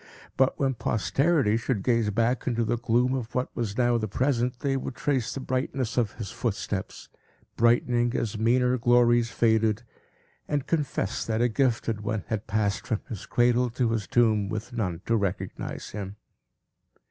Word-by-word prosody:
But, 130 0 +2
when 135 -1 +1
posterity 130 - +1
should 115 -3 -2
gaze 115 -2 +2
back 115 +4 0
into 120 -2 +1
the 115 +2 0
gloom 120 +2 +2
of 125 -4 -4
what 125 0 -2
was 110 -4 -3
now 120 -1 +3
the 110 - -2
present, 125 +2 0
they 135 -1 0
would 130 -1 -4
trace 130 -6 0
the - - -4
brightness 130 -1 -2
of 115 -5 +1
his 105 -5 -6
footsteps, 100 -4 -4 0.5
brightening 120 0 +2
as 110 -2 -1
meaner 125 +3 +2
glories 120 0 +4
faded, 110 -1 +2 0.6
and 145 -2 -1
confess, 145 - -1
that 110 -1 0
a 120 +1 +3
gifted 115 -3 0
one 105 -1 -2
had 110 -2 -3
passed 100 -3 -1
from 110 -4 -1
his 105 -6 -7
cradle 120 +1 +2
to 120 0 0
his 110 -4 -2
tomb, 110 -4 +2
with 110 +3 -5
none 90 -8 -2
to 115 - +2
recognize 100 -3 -3
him. 100 -1 -6
115 Hz, 165 wpm, -27 LUFS, 110-125 Hz, 0.6 s, glories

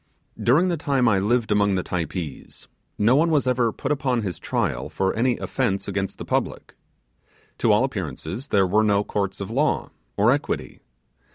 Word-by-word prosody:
During 160 +10 +4
the 170 - 0
time 140 -5 +1
I 100 -4 +3
lived 110 +3 +1
among 100 -1 +3
the 90 - -1
Typees, 85 -4 -5 0.3
no 115 +5 +4
one 165 +4 +3
was 150 -4 +2
ever 125 -2 +2
put - - -4
upon 130 -5 0
his 95 -4 -4
trial - - -2
for 95 0 0
any 120 +2 +1
offence 105 -7 -2
against 100 -1 -3
the - - -7
public. - - -2 0.8
To - - +3
all - - +4
appearance 100 - -4
there 100 -8 +3
were 105 +4 +3
no 100 -1 +2
courts 100 -2 -3
of 100 - -5
law 140 +5 0 0.3
or - - +4
equity. - - -2
110 Hz, 175 wpm, -23 LUFS, 95-130 Hz, 0.8 s, During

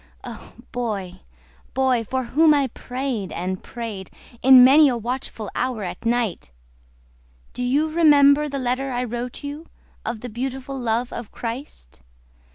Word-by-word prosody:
Oh, - - -10 0.2
boy, 200 -7 -4 0.6
boy, 260 -3 +2
for 260 +4 -2
whom 300 +6 +4
I 275 -2 +1
prayed 250 -6 -4
and 185 +2 -4
prayed 220 -6 -7 0.3
In 260 -1 +9
many 285 +3 +7
a 245 - -1
watchful 235 -3 -5
hour 250 -4 -2
at 185 +5 -5
night, 230 - -1 1.0
Do - - -6
you 275 +5 +2
remember 300 -2 +5
the 280 - -4
letter 255 +1 -1
I 245 0 -1
wrote 245 +2 -5
you 290 +3 -7 0.4
Of 225 -1 -4
the 250 - -6
beautiful 265 +3 -5
love 240 0 -1
of 235 -3 -7
Christ? 230 - -7
250 Hz, 145 wpm, -22 LUFS, 230-270 Hz, 1.0 s, In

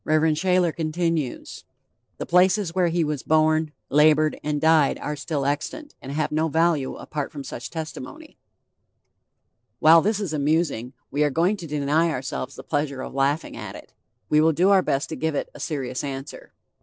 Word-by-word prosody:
Shayler 160 +3 +2
continues: 160 -3 -2 0.5
"The - - -4
places 185 0 +3
where 180 -1 +2
he 170 0 +1
was 150 -3 -2
born, 155 0 +2 0.2
labored 155 +1 +4
and 150 0 -1
died 160 -2 +4
are 150 - -4
still 140 0 -3
extant, 225 - -3
and 135 - -7
have 155 +2 -1
no 155 +1 +1
value 160 -3 +1
apart 145 -2 -5
from 145 -3 -7
such 120 - -7
testimony." 260 - -8 1.4
While 165 +1 +7
this 210 +2 0
is 190 -7 -3
amusing, 145 -4 0 0.2
we 145 +2 +1
are 150 - +3
going 170 +8 +1
to 170 - -8
deny 150 +3 +1
ourselves 130 -2 -4
the - - -10
pleasure 140 -3 -2
of - - -8
laughing 140 +3 0
at - - -7
it; - - -13 0.3
we 150 0 +4
will 160 +1 +4
do 180 +6 +3
our 195 -1 +6
best 135 -5 -1
to 160 - -4
give 160 -1 -2
it - - -3
a - - -12
serious 135 -4 -3
answer. 135 0 -7
155 Hz, 175 wpm, -24 LUFS, 145-165 Hz, 1.4 s, While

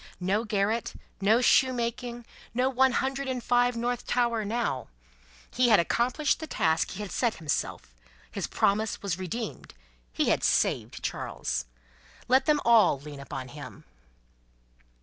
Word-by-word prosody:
No 195 +5 0
garret, 210 +2 -1 0.3
no 220 +5 +4
shoemaking, 240 -2 +1 0.3
no 255 +2 +2
One 265 0 +3
Hundred 270 +2 -1
and 255 -2 -3
Five, 245 0 +2
North 240 +1 -2
Tower, 235 -3 +1
now! 210 - -2 0.6
He 250 0 +3
had 215 - +6
accomplished 245 - +1
the 315 - -6
task 160 - +1
he 205 +2 -6
had 200 - -7
set 235 -3 0
himself, 150 - -3 0.4
his - - -3
promise 215 +2 0
was 190 -3 -2
redeemed, 215 - -5 0.4
he - - 0
had - - +1
saved - - +1
Charles. 65 0 -3 0.6
Let 260 +2 +3
them 300 -1 +3
all 230 - +5
lean 145 0 -9
upon 130 -2 -7
him. 145 +1 -10
235 Hz, 140 wpm, -28 LUFS, 190-245 Hz, 0.6 s, had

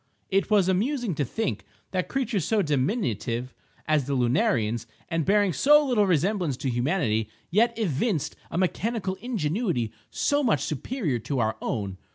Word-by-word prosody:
It 195 +1 +2
was 205 -4 +4
amusing 225 +3 0
to 145 - -1
think 125 - -2 0.3
that 185 -1 -1
creatures 235 - -1
so 215 +4 +2
diminutive 130 - -1 0.3
as 155 -3 +2
the 140 - 0
lunarians, 120 -3 +1 0.2
and 165 -2 0
bearing 200 -2 +3
so 295 - +5
little 225 -7 +2
resemblance 175 - +1
to 135 -1 -2
humanity, 120 - 0 0.2
yet 230 +5 +3
evinced 190 - 0
a - - -4
mechanical 190 +2 0
ingenuity 180 - -1 0.2
so 290 0 +1
much 215 - +2
superior 155 - -2
to 135 +5 -3
our 110 -2 +1
own. 95 -3 -3
175 Hz, 150 wpm, -26 LUFS, 130-215 Hz, 0.3 s, so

